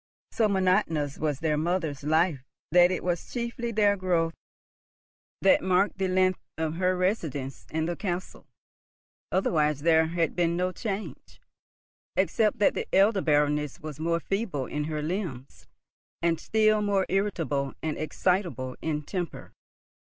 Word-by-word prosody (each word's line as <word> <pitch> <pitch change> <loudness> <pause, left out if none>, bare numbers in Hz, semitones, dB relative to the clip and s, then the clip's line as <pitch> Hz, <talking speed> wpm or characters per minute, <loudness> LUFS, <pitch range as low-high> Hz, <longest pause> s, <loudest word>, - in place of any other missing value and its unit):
So 220 - +2
monotonous 185 -7 +1
was 150 -2 -1
their 155 -2 +1
mother's 160 -3 -1
life 155 -2 +2 0.3
that 175 +1 +6
it 185 - -2
was 175 -1 -2
chiefly 235 -1 -3
their 205 -2 +3
growth 175 -4 0 1.1
that 195 - +5
marked 190 +2 +1
the 190 - +1
length 185 0 +2 0.2
of 160 0 -2
her 185 0 +1
residence 160 - -2
in 160 0 -1
the 175 +1 -2
castle. 180 -2 -5 0.8
Otherwise 150 -6 +1
there 160 0 +4
had 165 -1 -1
been 170 -1 +1
no 180 +1 0
change, 205 +1 -6 0.8
except 215 -2 +2
that 205 - +3
the - - -3
elder 195 +1 +4
Baroness 150 -2 +1
was 155 -1 -8
more 170 +1 0
feeble 195 - -2
in 150 +4 -3
her 155 -1 -3
limbs, 155 -7 -5 0.5
and 170 -1 +1
still 215 -1 +2
more 200 -2 +1
irritable 165 -9 -1
and 155 -1 -1
excitable 155 - -1
in 150 -2 -2
temper. 175 +1 -5
175 Hz, 140 wpm, -27 LUFS, 155-190 Hz, 1.1 s, that